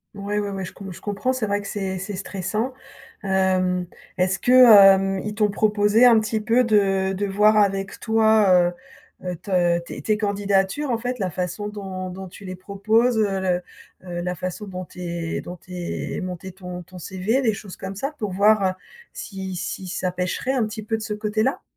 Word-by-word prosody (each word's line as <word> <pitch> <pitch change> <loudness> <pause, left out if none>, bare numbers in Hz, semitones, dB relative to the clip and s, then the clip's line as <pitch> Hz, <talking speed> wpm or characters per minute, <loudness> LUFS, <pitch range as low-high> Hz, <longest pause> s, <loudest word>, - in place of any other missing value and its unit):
Ouais, 200 +1 -3
ouais, 205 -1 -1
ouais, 195 -1 -4
je 180 - -6
comp 195 -2 -9
je - - -11
comprends. 205 +5 -1
C'est 250 -4 -2
vrai 205 0 0
que 205 - -9
c'est 190 -2 -3
c'est 200 +2 -5
stressant. 200 +6 -3 0.5
Hem, 185 -2 +1 0.3
est-ce 185 +1 +2
que, 245 - 0
hem, 195 -6 +8
ils 210 - -3
t'ont 210 -1 +2
proposé 210 +2 +3
un 235 -3 +7
petit 220 0 -1
peu 230 +4 +3
de 195 -4 +2
de 200 +2 -2
voir 210 +2 +4
avec 195 -1 +1
toi, 220 -6 +4 0.5
heu - - -6
heu, 180 - -2
te 175 -3 +2
tes 170 - -9
tes 215 - +2
candidatures, 200 +6 0
en 230 - 0
fait, 250 +1 -3
la 185 -4 -2
façon 180 +5 -3
dont 190 -3 -6
dont 190 +1 -8
tu 190 +2 -13
les 185 0 -6
proposes, 220 +6 +1
heu, 200 -3 +1
le, 180 -1 0 0.5
heu, 175 0 -4
la 180 +1 -2
façon 185 +5 -5
dont 185 -1 -6
tu 180 - -12
es 170 -2 -3
dont 180 - -8
tu 185 - -18
es 175 +3 -4
monter 185 0 -6
ton 180 -1 -8
ton 185 +1 -12
CV, 190 +9 -1
les 225 -4 +2
choses 200 -3 -9
comme 190 0 -7
ça, 275 +9 -3
pour 210 -4 -3
voir, 210 +2 +4
heu, - - +1 0.4
si 190 -2 -6
si 185 +1 -5
ça 185 0 -2
pêcherait 185 +8 -2
un 240 -5 +1
petit 215 0 -7
peu 225 +2 -1
de 220 - -5
ce 215 -1 -3
côté-là? 215 +4 -1
195 Hz, 205 wpm, -23 LUFS, 185-215 Hz, 0.5 s, hem